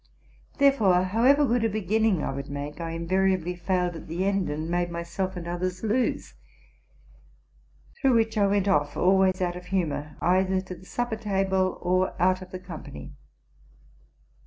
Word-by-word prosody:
Therefore, 220 -11 +4
however 245 +10 +4
good 240 -2 +1
a 225 - +2
beginning 215 -3 +1
I - - -2
would 140 +1 -6
make, 145 +3 -6
I 165 - -3
invariably 180 +1 0
failed 180 0 -1
at - - -9
the 170 +4 -2
end, 195 -3 0
and 155 +2 -3
made 175 +1 0
myself 170 +3 -4
and 170 -1 -6
others 180 +2 -3
lose; 230 +4 0 1.6
through 265 -3 +3
which 225 0 +2
I 205 -2 +3
went 200 0 +1
off, 145 -6 +1
always 190 0 +3
out 175 -1 -1
of 180 0 -9
humor, 155 -5 -2
either 185 +1 +2
to 185 0 -7
the 185 - -16
supper 240 -2 -2
table 190 -3 0
or 185 +1 0
out 185 +1 +2
of 185 - -10
the 185 - -6
company. 160 - -9
185 Hz, 160 wpm, -26 LUFS, 175-200 Hz, 1.6 s, Therefore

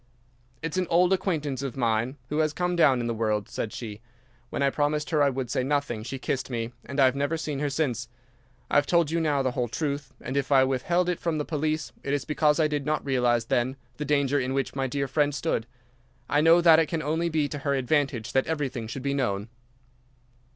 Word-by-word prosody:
"'"It's 165 +2 -3
an 185 -1 +1
old 180 +2 +4
acquaintance 155 -8 -1
of 135 -2 -5
mine 120 +2 0
who 150 - -1
has 155 -1 +2
come 180 +2 -1
down 140 -7 +4
in - - -3
the 115 - -1
world," 110 -2 -1
said 110 - -4
she. 105 -2 -7 0.5
When - - -2
I 140 - +3
promised 150 +2 0
her 155 -2 +3
I 140 - +5
would 130 -2 -3
say - - +1
nothing 140 -5 -1
she 120 +5 -5
kissed 130 -1 -3
me, 115 -2 -3
and 140 +1 -4
I 135 - +7
have 130 0 +3
never 145 +4 0
seen 150 -3 -3
her 145 0 0
since. 125 -5 -1 0.6
I - - +4
have 145 - +3
told 170 -3 +3
you 170 - +1
now 145 -4 +1
the 130 - +1
whole 125 -1 -1
truth, 145 +2 -3
and 130 - -5
if 140 0 -1
I 135 -1 +6
withheld 155 +7 +1
it 180 - -1
from 165 -2 -1
the 150 - -2
police 155 0 -2
it 140 +1 -1
is 140 - -3
because 150 0 +2
I 155 - +4
did 150 -1 -2
not 155 +1 -1
realize 120 -4 +2
then 125 +3 0 0.2
the 150 - -3
danger 140 -1 +2
in 130 +1 -2
which 135 0 -1
my 135 -1 0
dear 140 +2 -2
friend 145 +1 +1
stood. 115 -4 -1 0.6
I 145 - +2
know 165 +2 +6
that 165 -2 +7
it 160 - +2
can 160 -1 -2
only 160 +3 0
be 155 -2 +1
to 145 - -5
her 140 0 0
advantage 135 -3 0
that 135 - +2
everything 135 -7 -2
should 125 +3 -6
be 140 0 0
known. 110 -6 -1
140 Hz, 235 wpm, -26 LUFS, 130-155 Hz, 0.6 s, I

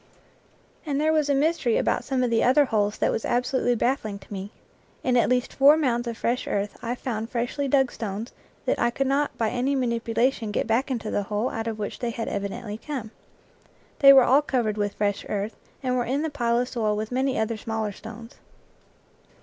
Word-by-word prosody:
And 285 -3 -1
there 310 +1 +2
was 305 -2 +2
a 280 - +3
mystery 295 -4 +2
about - - +1
some 265 -2 0
of 245 - 0
the 225 - +3
other 270 +4 +5
holes 210 -4 0
that - - +1
was - - -2
absolutely 245 0 +1
baffling 225 -4 -1
to 200 - -12
me. 195 +1 -5 0.5
In 250 -1 +2
at 240 - +3
least 250 0 0
four 285 +3 +6
mounds 240 -5 0
of 230 -1 -4
fresh 240 +2 -1
earth 205 0 -2
I 240 +1 -2
found 225 -3 -4
freshly 245 +4 -2
dug 265 -2 +3
stones 220 +2 -5 0.3
that - - 0
I 235 - +3
could 270 +3 -1
not 280 +2 0
by 225 -2 0
any 255 +3 0
manipulation 235 -1 0
get 205 - -1
back 235 +5 +1
into 230 -4 -3
the - - 0
hole 215 +4 0
out 225 0 -4
of 225 -1 -3
which 210 -1 -5
they 240 - -2
had 230 0 -4
evidently 205 +2 -4
come. 250 -6 -5 0.9
They 275 -1 +9
were 270 -2 +8
all 270 +4 +5
covered 240 -7 0
with 205 -1 -2
fresh 205 -1 -1
earth, 205 +1 -2 0.3
and 255 -1 0
were 245 -1 0
in 275 +5 -1
the 320 - -2
pile 235 -4 +1
of 245 +1 0
soil 215 -4 -1
with 215 +2 -4
many 260 +1 0
other 220 +1 0
smaller 220 0 -3
stones. 225 +3 -11
240 Hz, 210 wpm, -25 LUFS, 220-265 Hz, 0.9 s, They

